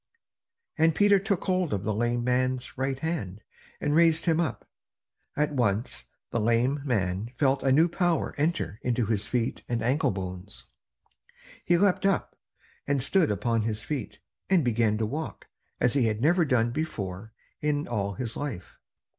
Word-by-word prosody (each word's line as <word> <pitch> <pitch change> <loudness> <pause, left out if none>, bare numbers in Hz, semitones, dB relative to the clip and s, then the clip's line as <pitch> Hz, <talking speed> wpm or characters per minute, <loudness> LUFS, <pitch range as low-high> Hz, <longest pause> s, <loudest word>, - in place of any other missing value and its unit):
And 160 0 +4
Peter 205 +2 +5
took 200 -2 -1
hold 185 - 0
of 95 - -4
the 110 - -1
lame 120 +2 0
man's 130 0 0
right 135 0 -1
hand, 135 - -4 0.4
and 145 - 0
raised 165 0 +4
him 165 -2 +2
up. 170 - -2 0.7
At 150 0 +1
once 115 -3 -1 0.3
the 115 - 0
lame 120 +6 +2
man 100 -5 -1
felt 135 -1 +2
a 135 - +2
new 160 +6 +5
power 175 -1 0
entering 150 -7 -1
into 120 -1 0
his 105 -1 -1
feet 120 -2 -1
and 115 -2 -1
ankle 130 +6 +2
bones. 95 0 -6 1.0
He 175 - +4
leaped 195 +1 +3
up, 195 - 0 0.5
and 140 -2 +1
stood 175 +4 +3
upon 110 +3 0
his 110 0 -2
feet, 135 -6 -4 0.3
and 180 -7 +3
began 115 -2 +2
to 110 - 0
walk, 150 +9 -5 0.3
as 125 - +2
he 135 -5 +3
had 110 -1 -1
never 165 +6 +3
done 120 -4 +2
before 110 - -4 0.3
in 150 -1 0
all 100 -4 -2
his 120 -3 -3
life. 125 -12 -6
125 Hz, 165 wpm, -27 LUFS, 110-155 Hz, 1.0 s, Peter